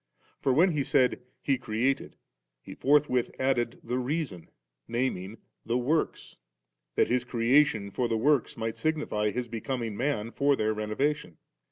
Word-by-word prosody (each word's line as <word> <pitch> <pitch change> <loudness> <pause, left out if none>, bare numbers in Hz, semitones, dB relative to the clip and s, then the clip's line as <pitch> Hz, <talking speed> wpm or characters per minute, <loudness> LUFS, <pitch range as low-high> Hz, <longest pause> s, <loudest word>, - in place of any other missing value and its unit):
For 135 - +1
when 170 +8 +5
He 150 -3 0
said 130 -3 +2
* - - -44
He 135 -3 +1
created,' 120 +3 -1 0.4
He - - -10
forthwith 140 -3 +2
added 125 -3 0
the 125 +2 -2
reason, 130 - -3 0.4
naming 115 -4 -2 0.3
'the 115 +1 0
works,' 145 +6 -1 0.6
that - - +3
His 125 0 +1
creation 120 -3 +2
for 120 +4 0
the 115 - 0
works 140 +1 +2
might 115 -1 -3
signify 150 -10 0
His 125 +3 -3
becoming 115 -1 -3
man 120 -3 -1
for 140 +2 +2
their 110 -3 0
renovation. 110 - -2
125 Hz, 150 wpm, -28 LUFS, 115-140 Hz, 0.6 s, when